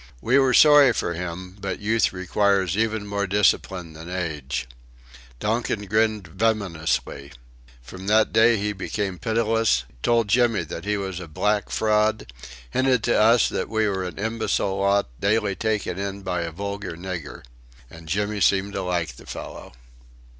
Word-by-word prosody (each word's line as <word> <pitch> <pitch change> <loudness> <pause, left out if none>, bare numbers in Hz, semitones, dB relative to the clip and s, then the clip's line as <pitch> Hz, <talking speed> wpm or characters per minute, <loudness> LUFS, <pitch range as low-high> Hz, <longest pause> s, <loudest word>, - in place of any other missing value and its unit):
We 130 - +3
were 130 -2 +3
sorry 145 -4 +7
for 85 - -2
him, 90 +2 -6
but 95 -1 -3
youth 110 +2 +1
requires 95 0 +1
even 110 -1 0
more 100 0 -2
discipline 95 -3 +1
than 80 +2 -10
age. 75 -8 -3 0.7
Donkin 110 -1 -1
grinned 110 0 +1
venomously. 95 -9 -2 0.5
From 90 +10 -10
that 110 +1 +3
day 115 +1 +5
he 105 +1 -2
became 95 -1 -4
pitiless; 115 - +1 0.2
told 115 - +2
Jimmy 115 -2 +2
that 80 +2 -7
he 105 0 0
was 95 -2 -4
a 90 - -8
"black 105 +7 0
fraud"; 110 - +1 0.4
hinted 130 -3 +2
to 120 - +2
us 115 +3 +5
that - - -3
we 110 -1 +1
were 95 -2 -1
an 90 -2 -6
imbecile 110 -2 -1
lot, 100 -2 +2
daily 100 -1 +1
taken 105 -2 -2
in 100 0 -4
by 90 -2 -2
a 85 -1 -4
vulgar 100 0 -5
nigger. 85 -4 -7 0.4
And 80 +4 -13
Jimmy 105 +3 -1
seemed 100 +2 +2
to 95 - -2
like 85 -8 -2
the - - -15
fellow! - - -8
100 Hz, 155 wpm, -24 LUFS, 90-110 Hz, 0.7 s, sorry